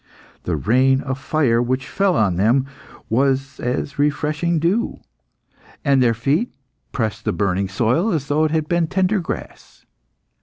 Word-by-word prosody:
The - - 0
rain 130 +4 +2
of 130 -1 -4
fire 135 -6 +1
which 130 +2 -1
fell 195 -1 +1
on 100 -5 +2
them 115 +8 +2 0.4
was 135 +3 0
as 125 +3 -2
a - - -20
refreshing 150 +3 0
dew, 180 +9 0 0.9
and 140 -2 +4
their 115 -2 +3
feet 140 - 0 0.4
pressed 110 -2 -2
the - - 0
burning 100 -1 -1
soil 120 - +1
as 150 -6 -2
though 150 +2 +2
it - - +1
had 155 -1 -1
been 170 -1 +1
tender 190 +4 +1
grass. 170 - -8
135 Hz, 155 wpm, -20 LUFS, 120-160 Hz, 0.9 s, and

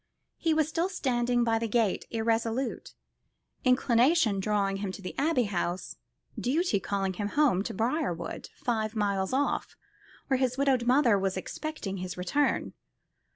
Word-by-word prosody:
He 325 -2 +1
was 310 -2 +2
still 335 +3 -1
standing 245 -8 +1
by 225 -1 +2
the 230 - -1
gate 220 -3 +1
irresolute, 230 +2 -1 0.7
inclination 250 - +3
drawing 195 -1 0
him 195 -1 -3
to - - -8
the 185 - -5
Abbey 280 -3 +2
House, 180 -3 -3 0.4
duty 275 - +1
calling 195 -1 -1
him 205 +2 -3
home 260 -5 +3
to - - -4
Briarwood, 225 - -2
five 220 -2 -2
miles 200 -3 0
off, 275 +2 0 0.5
where 265 -2 +1
his 255 -1 0
widowed 265 -3 +2
mother 245 -5 +4
was 190 -1 -1
expecting 200 -2 -5
his 180 -1 -5
return. 185 +12 0
230 Hz, 145 wpm, -29 LUFS, 200-270 Hz, 0.7 s, mother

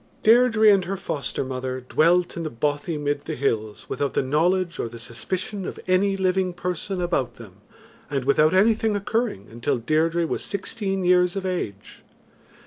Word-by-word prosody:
Deirdre 225 -1 +5
and 195 -3 +3
her 195 +2 -3
foster 140 -8 -3
mother 130 0 -4
dwelt 170 +7 +2
in 170 - -4
the 160 - -3
bothy 145 +5 -2
mid 145 -1 -2
the - - -3
hills 110 -5 -2
without 140 -1 -2
the - - +2
knowledge 170 +6 +1
or 115 - -2
the 120 - -10
suspicion 180 - -4
of - - -6
any 195 +2 +2
living 185 -1 +1
person 180 +2 -3
about 155 -9 -1
them 105 -5 -13 0.5
and 135 -3 -2
without 150 +3 +4
anything 220 +2 +3
occurring, 205 - -2
until 120 +2 -1
Deirdre 160 +7 +1
was - - -3
sixteen 195 -1 -3
years 180 0 +4
of 195 -1 -3
age. 105 - -4
170 Hz, 165 wpm, -24 LUFS, 135-190 Hz, 0.5 s, Deirdre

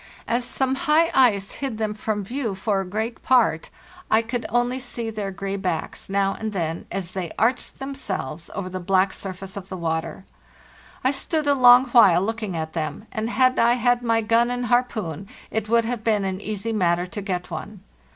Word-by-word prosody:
As 240 +2 0
some 265 +1 0
high 320 +3 +3
ice 215 -7 +4
hid 270 -5 -4
them 215 -1 -1
from 210 -1 -2
view 235 -1 -3
for 195 0 0
a - - -5
great 220 +4 -3
part, 235 -11 +3 0.4
I 220 +1 +4
could 235 +1 -3
only 245 +2 +1
see 240 -3 -4
their 210 -2 -3
gray 195 +1 -4
backs, 180 -3 -3
now 195 0 +1
and 220 -1 -5
then, 165 -3 -3
as 185 -3 -3
they 185 -3 -4
arched 245 +3 0
themselves 190 - -5
over 195 -2 -3
the 185 0 -5
black 190 +1 +2
surface 190 0 -6
of 195 -1 -8
the 185 - -5
water. 165 +2 -3 0.8
I 260 - +3
stood 305 +2 -1
a 285 - +4
long 250 -1 +7
while 195 -7 +6
looking 215 -4 -3
at 160 0 -4
them, 165 +6 -4
and 220 -1 -2
had 255 +1 +3
I 235 +1 +5
had 245 0 +2
my 230 -1 +2
gun 230 +2 +3
and 245 0 -2
harpoon, 215 -7 -1 0.2
it 220 -1 -2
would 230 0 +3
have 235 -1 -3
been 210 -3 +1
an 190 0 -3
easy 215 +2 -3
matter 175 -3 +1
to 205 +3 -6
get 185 -3 -4
one. 185 +5 -7
215 Hz, 195 wpm, -23 LUFS, 190-245 Hz, 0.8 s, long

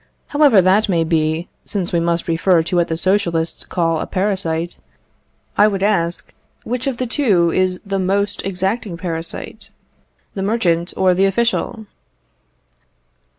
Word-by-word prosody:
However 285 -10 +5
that 200 +4 +3
may 170 -3 +2
be, 160 +1 0 0.2
since 190 -5 -4
we 170 - +3
must 170 0 -1
refer 165 0 +3
to 180 +3 -3
what 175 0 +2
the 160 - -2
Socialists 170 -3 0
call 165 -2 0
a - - -4
parasite, 180 -4 -2 0.8
I 210 - +7
would 195 -2 -1
ask, 175 -5 0 0.3
which 250 +3 -3
of 265 -3 -1
the 255 - -2
two 210 - +2
is 185 0 +1
the 195 -1 -2
most 200 +2 0
exacting 190 0 -2
parasite 165 -2 -6 0.6
the 195 - -4
merchant 185 -5 0
or 185 -1 +4
the 190 +2 +3
official? 225 +1 0
185 Hz, 145 wpm, -19 LUFS, 170-205 Hz, 0.8 s, I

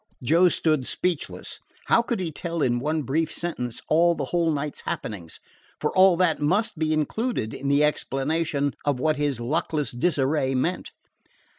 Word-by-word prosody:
Joe 170 +7 +5
stood 155 -5 +1
speechless. 175 -4 -2 0.3
How - - +4
could 235 -2 -2
he 175 -3 -2
tell, 165 +1 -3
in 120 -1 +1
one 155 +3 -1
brief 155 +5 0
sentence, 125 -9 -4
all 170 +2 +4
the - - -3
whole 170 -2 +1
night's 150 0 -3
happenings? 90 -7 -5 0.4
for - - -2
all 185 -2 +6
that 165 -4 +2
must 180 +4 +1
be 155 -1 +1
included 155 - -1
in 140 - -5
the 140 +1 +4
explanation 150 0 0
of 145 -3 0
what 155 +2 +1
his 145 -4 -1
luckless 150 +2 -1
disarray 135 -1 +1
meant. 170 +8 -1
155 Hz, 160 wpm, -25 LUFS, 140-170 Hz, 0.4 s, all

